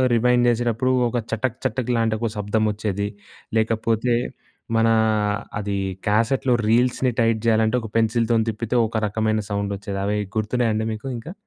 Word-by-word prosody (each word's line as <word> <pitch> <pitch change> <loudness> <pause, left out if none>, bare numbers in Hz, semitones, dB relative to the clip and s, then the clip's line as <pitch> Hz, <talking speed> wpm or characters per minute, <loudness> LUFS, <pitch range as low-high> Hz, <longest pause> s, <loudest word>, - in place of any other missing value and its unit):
Rewind 125 +1 +3
చేసేటప్పుడు 120 +2 +1 0.2
ఒక 120 - -2
చటక్ 115 +2 -1
చటక్ 125 0 -1
లాంటి 115 -1 +1
ఒక 115 0 -1
శబ్దం 105 +1 0
వచ్చేది. 105 -1 -2 0.5
లేకపోతే 115 +2 +1 0.6
మనా 115 0 +4 0.7
అదీ 100 -1 -2 0.3
క్యాసెట్లో 120 +5 +2
రీల్స్‌ని 125 +2 +2
టైట్ 115 -1 +2
చేయాలంటే 110 +1 +3
ఒక 110 - -7
పెన్సిల్‌తోని 115 0 +2
తిప్పితే 115 +3 -3
ఒక 110 +1 -3
రకమైన 110 +1 0
సౌండ్ 100 0 -2
వచ్చేది 100 -1 -5
అవి 105 +1 0 0.2
గుర్తున్నాయా 110 +2 +1
అండి 110 0 -1
మీకు 110 +5 -7
ఇంకా? 155 +10 -8
110 Hz, 145 wpm, -22 LUFS, 110-120 Hz, 0.7 s, మనా